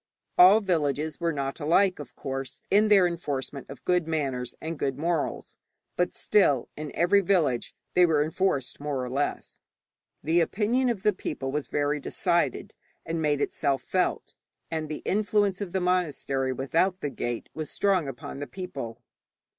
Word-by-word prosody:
All 190 Hz, +5 st, +8 dB
villages 155 Hz, -5 st, 0 dB
were 170 Hz, -1 st, +1 dB
not 140 Hz, -1 st, -3 dB
alike, 180 Hz, +5 st, +3 dB
of 145 Hz, -4 st, -9 dB
course, 135 Hz, -1 st, -5 dB
in 210 Hz, +2 st, +5 dB
their 200 Hz, -3 st, +6 dB
enforcement 140 Hz, -6 st, -3 dB
of 135 Hz, -, -11 dB
good 180 Hz, -2 st, +2 dB
manners 135 Hz, -6 st, -2 dB
and 160 Hz, -1 st, -5 dB
good 135 Hz, -1 st, -1 dB
morals, 165 Hz, 0 st, -2 dB, 0.4 s
but, 180 Hz, -, 0 dB
still, 145 Hz, -, +3 dB
in 150 Hz, -1 st, -6 dB
every 190 Hz, +4 st, +4 dB
village 165 Hz, -11 st, +1 dB, 0.2 s
they 180 Hz, 0 st, +6 dB
were 150 Hz, -3 st, +3 dB
enforced 155 Hz, -4 st, -1 dB
more 145 Hz, -3 st, -2 dB
or 125 Hz, -, -5 dB
less. 140 Hz, +2 st, -2 dB, 0.6 s
The 165 Hz, +3 st, +3 dB
opinion 230 Hz, +9 st, +1 dB
of 215 Hz, -5 st, -2 dB
the 210 Hz, -1 st, +4 dB
people 135 Hz, -7 st, -4 dB
was 150 Hz, 0 st, -2 dB
very 145 Hz, +1 st, 0 dB
decided, -, -, 0 dB, 0.3 s
and 165 Hz, 0 st, -2 dB
made 145 Hz, -2 st, +1 dB
itself 140 Hz, -1 st, 0 dB
felt, -, -, -1 dB, 0.4 s
and 160 Hz, -2 st, -2 dB
the 155 Hz, -, -5 dB
influence 205 Hz, -1 st, +1 dB
of 195 Hz, -4 st, -4 dB
the 190 Hz, -, 0 dB
monastery 150 Hz, -7 st, 0 dB
without 165 Hz, +9 st, 0 dB
the 145 Hz, -, -2 dB
gate 120 Hz, -2 st, -4 dB
was 155 Hz, -2 st, -5 dB
strong 190 Hz, -6 st, +1 dB
upon 135 Hz, +1 st, -7 dB
the 145 Hz, -, -5 dB
people. 120 Hz, -11 st, -7 dB
155 Hz, 160 wpm, -27 LUFS, 140-185 Hz, 0.6 s, All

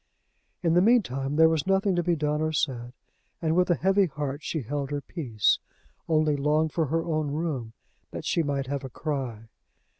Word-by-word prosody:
In 165 Hz, -1 st, +3 dB
the 175 Hz, -, +5 dB
mean 235 Hz, +3 st, +5 dB
time 135 Hz, 0 st, -3 dB
there 160 Hz, +1 st, +7 dB
was 160 Hz, 0 st, 0 dB
nothing 195 Hz, 0 st, +2 dB
to 175 Hz, -, +2 dB
be 175 Hz, 0 st, +1 dB
done 150 Hz, 0 st, -1 dB
or 155 Hz, 0 st, 0 dB
said; 130 Hz, -7 st, -1 dB, 0.5 s
and 160 Hz, -1 st, 0 dB
with 180 Hz, 0 st, +3 dB
a 175 Hz, -, +4 dB
heavy 195 Hz, +2 st, +3 dB
heart 145 Hz, -1 st, -4 dB
she 155 Hz, -2 st, -3 dB
held 140 Hz, +3 st, -3 dB
her 145 Hz, -1 st, -2 dB
peace 130 Hz, -, 0 dB, 0.5 s
only 155 Hz, -2 st, +3 dB
longed 150 Hz, +2 st, +1 dB
for 160 Hz, -3 st, +1 dB
her 165 Hz, +4 st, 0 dB
own 155 Hz, -3 st, -1 dB
room, 140 Hz, -7 st, -3 dB, 0.4 s
that -, -, -7 dB
she 170 Hz, -, +1 dB
might 140 Hz, -3 st, -1 dB
have 140 Hz, +1 st, -3 dB
a 130 Hz, -, -6 dB
cry. 130 Hz, -5 st, -4 dB
155 Hz, 200 wpm, -27 LUFS, 140-165 Hz, 0.5 s, there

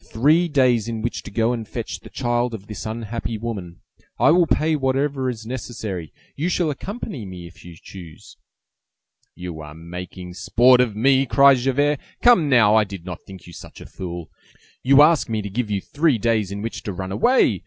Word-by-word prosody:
three 155 Hz, +9 st, +3 dB
days 125 Hz, -7 st, +2 dB
in 115 Hz, -1 st, -4 dB
which 120 Hz, -, -3 dB
to -, -, -10 dB
go 115 Hz, +3 st, +1 dB
and 115 Hz, -3 st, -5 dB
fetch 110 Hz, -6 st, -5 dB
the -, -, -13 dB
child 120 Hz, -1 st, -1 dB
of 100 Hz, -2 st, -10 dB
this 105 Hz, +1 st, -7 dB
unhappy 115 Hz, 0 st, -4 dB
woman. 100 Hz, -7 st, -6 dB, 0.4 s
I -, -, +5 dB
will 175 Hz, 0 st, +4 dB
pay 155 Hz, +1 st, +1 dB
whatever 135 Hz, -1 st, 0 dB
is 115 Hz, -3 st, -6 dB
necessary. 110 Hz, -, -6 dB, 0.2 s
You 160 Hz, +5 st, -1 dB
shall 175 Hz, -3 st, 0 dB
accompany 190 Hz, -, -6 dB
me 90 Hz, -3 st, -9 dB
if 85 Hz, +1 st, -14 dB
you 85 Hz, -1 st, -11 dB
choose." 85 Hz, -5 st, -12 dB, 1.0 s
"You 90 Hz, -3 st, -7 dB
are 75 Hz, 0 st, -10 dB
making 90 Hz, +2 st, -8 dB
sport 125 Hz, +7 st, +4 dB
of 115 Hz, -5 st, -1 dB
me!" 135 Hz, +4 st, +3 dB
cried 140 Hz, +1 st, +6 dB
Javert. 140 Hz, +3 st, +1 dB, 0.2 s
"Come 210 Hz, -12 st, +5 dB
now, 115 Hz, -5 st, +5 dB
I 110 Hz, 0 st, +5 dB
did 100 Hz, -4 st, -9 dB
not 90 Hz, -1 st, -6 dB
think 95 Hz, -2 st, -12 dB
you 85 Hz, -, -13 dB
such -, -, -12 dB
a -, -, -11 dB
fool! 85 Hz, -3 st, -7 dB, 0.5 s
You 140 Hz, +2 st, +6 dB
ask 155 Hz, -4 st, +3 dB
me 110 Hz, -2 st, -2 dB
to 100 Hz, -, -5 dB
give 115 Hz, +1 st, -2 dB
you 100 Hz, -1 st, 0 dB
three 145 Hz, -, +1 dB
days 110 Hz, -3 st, 0 dB
in 100 Hz, +1 st, -5 dB
which 115 Hz, -, -5 dB
to 105 Hz, -, -4 dB
run 95 Hz, 0 st, -5 dB
away! 245 Hz, -, +3 dB
115 Hz, 195 wpm, -22 LUFS, 95-135 Hz, 1.0 s, cried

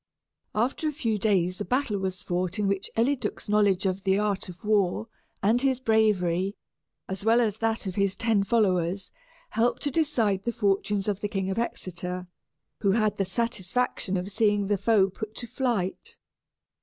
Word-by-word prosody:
After 250 Hz, +8 st, 0 dB
a -, -, +1 dB
few 230 Hz, -8 st, -1 dB
days 185 Hz, -3 st, +1 dB
a -, -, +1 dB
battle 250 Hz, -5 st, 0 dB
was 190 Hz, -1 st, -3 dB
fought, 180 Hz, 0 st, -1 dB
in 210 Hz, -1 st, +1 dB
which 195 Hz, 0 st, -1 dB
Eliduc's 255 Hz, +2 st, 0 dB
knowledge 205 Hz, -2 st, +3 dB
of 190 Hz, 0 st, -1 dB
the 190 Hz, -1 st, +3 dB
art 205 Hz, -3 st, -1 dB
of 180 Hz, +3 st, -11 dB
war 210 Hz, 0 st, +2 dB, 0.4 s
and 225 Hz, +5 st, +3 dB
his 265 Hz, -2 st, +2 dB
bravery, 200 Hz, -5 st, +2 dB, 0.5 s
as 190 Hz, +1 st, -5 dB
well 225 Hz, +2 st, +4 dB
as 220 Hz, -3 st, 0 dB
that 225 Hz, -1 st, 0 dB
of 190 Hz, -, -3 dB
his 200 Hz, 0 st, +1 dB
ten 220 Hz, -1 st, +2 dB
followers, 190 Hz, -3 st, +1 dB, 0.4 s
helped 230 Hz, +2 st, +1 dB
to 290 Hz, -, 0 dB
decide 235 Hz, -, +1 dB
the 235 Hz, -, -1 dB
fortunes 200 Hz, -2 st, 0 dB
of 205 Hz, -1 st, -1 dB
the 205 Hz, -, 0 dB
King 195 Hz, -1 st, -2 dB
of 200 Hz, -, -1 dB
Exeter, 180 Hz, -5 st, -4 dB, 0.5 s
who 200 Hz, -2 st, +2 dB
had 215 Hz, -2 st, +1 dB
the 195 Hz, -, +1 dB
satisfaction 230 Hz, -1 st, -1 dB
of 180 Hz, +3 st, -4 dB
seeing 205 Hz, -1 st, +2 dB
the 205 Hz, +1 st, +1 dB
foe 210 Hz, -3 st, +4 dB
put 215 Hz, +2 st, -7 dB
to 240 Hz, -, -4 dB
flight. 245 Hz, -, -2 dB
205 Hz, 175 wpm, -27 LUFS, 190-230 Hz, 0.5 s, well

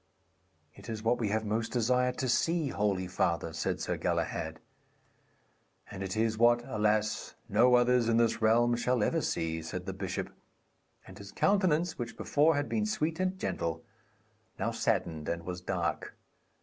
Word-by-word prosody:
'It -, -, -12 dB
is 110 Hz, -1 st, -5 dB
what 120 Hz, +2 st, +2 dB
we 110 Hz, -3 st, 0 dB
have 110 Hz, +1 st, -1 dB
most 110 Hz, +2 st, -1 dB
desired 125 Hz, +1 st, +1 dB
to 130 Hz, -, -1 dB
see, 165 Hz, +4 st, +1 dB
holy 100 Hz, -5 st, 0 dB
father,' 85 Hz, -2 st, -1 dB
said 85 Hz, -, -2 dB
Sir -, -, -2 dB
Galahad. -, -, -2 dB, 1.3 s
'And 95 Hz, -, -7 dB
it 95 Hz, +2 st, -3 dB
is 110 Hz, 0 st, +1 dB
what, 120 Hz, 0 st, +5 dB
alas, 110 Hz, 0 st, 0 dB
no 120 Hz, +4 st, +5 dB
others 120 Hz, -1 st, +3 dB
in 115 Hz, -, +3 dB
this 115 Hz, 0 st, +2 dB
realm 120 Hz, +2 st, +4 dB
shall 120 Hz, -1 st, +1 dB
ever -, -, +1 dB
see,' 80 Hz, 0 st, -2 dB
said 90 Hz, +3 st, -6 dB
the 95 Hz, -, -4 dB
bishop; 95 Hz, -1 st, -4 dB, 0.7 s
and 95 Hz, +2 st, -12 dB
his 100 Hz, 0 st, -10 dB
countenance, 180 Hz, -5 st, +1 dB
which 120 Hz, -1 st, -5 dB
before 150 Hz, +2 st, +3 dB
had 145 Hz, 0 st, -1 dB
been 215 Hz, -1 st, 0 dB
sweet 165 Hz, -5 st, -1 dB
and 185 Hz, 0 st, 0 dB
gentle, 80 Hz, -, -3 dB, 0.7 s
now -, -, -1 dB
saddened 80 Hz, -3 st, -1 dB
and 85 Hz, 0 st, -3 dB
was 90 Hz, -1 st, -5 dB
dark. 90 Hz, -2 st, -3 dB
115 Hz, 160 wpm, -30 LUFS, 95-125 Hz, 1.3 s, what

